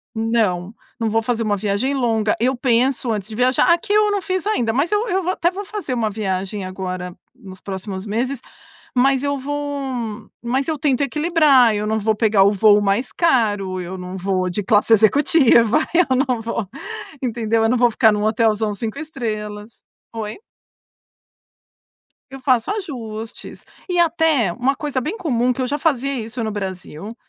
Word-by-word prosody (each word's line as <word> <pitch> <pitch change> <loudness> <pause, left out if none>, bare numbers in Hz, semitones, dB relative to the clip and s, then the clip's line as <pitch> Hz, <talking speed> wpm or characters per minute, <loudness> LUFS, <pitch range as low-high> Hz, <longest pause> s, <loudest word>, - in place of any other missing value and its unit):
Não, 220 -4 0 0.2
não 225 -1 0
vou 225 +1 +1
fazer 235 0 -1
uma 205 -2 0
viagem 210 +7 -1
longa. 225 -5 +1
Eu 255 +3 +1
penso 245 0 +1
antes 205 -2 -3
de 215 - -8
viajar 255 +7 +3
aqui 405 +5 -2
eu 420 0 +4
não 405 -1 0
fiz 370 +2 -2
ainda, 245 - +1
mas 280 +8 0
eu 420 +3 +1
eu 380 0 0
vou 365 - 0
até 345 -2 +1
vou 400 +3 -6
fazer 405 -9 -4
uma 225 -3 0
viagem 195 -1 -3
agora, 185 -1 -5 0.2
nos 190 -6 -12
próximos 190 0 -6
meses, 240 +5 -2 0.6
mas 270 +2 +3
eu 285 0 0
vou 270 -5 -4
mas 260 +3 -1
eu 315 -2 -1
tento 275 -2 +1
equilibrar. 285 -5 +4
Eu 210 +1 -2
não 220 0 0
vou 220 +1 +1
pegar 210 -2 +3
o 200 - +4
voo 210 0 +5
mais 205 +5 0
caro, 205 - +1
eu 180 +2 -6
não 180 +1 -7
vou 185 -1 -1
de 205 - -2
classe 210 +2 +3
executiva, 235 - +4 0.2
eu 330 -7 +4
não 255 -2 +1
vou 225 -3 -4 0.5
entendeu. 230 -2 0
Eu 225 - +3
não 250 - +2
vou 240 0 +4
ficar 220 -1 +4
num 210 0 -1
hotelzão 215 -1 +1
5 220 +5 -4
estrelas 215 -7 -6 0.3
Oi? 215 -1 -5 1.9
Eu 270 - -9
faço 255 - +1
ajustes 230 - -7 0.3
e 355 -1 +1
até 320 - +2
uma 260 +7 0
coisa 285 -3 -2
bem 315 - -4
comum 250 - +1
que 260 - -4
eu 255 - 0
já 290 - -1
fazia 275 -3 0
isso 230 +2 -5
no 220 - -2
Brasil. 190 0 -6
230 Hz, 175 wpm, -20 LUFS, 210-275 Hz, 1.9 s, voo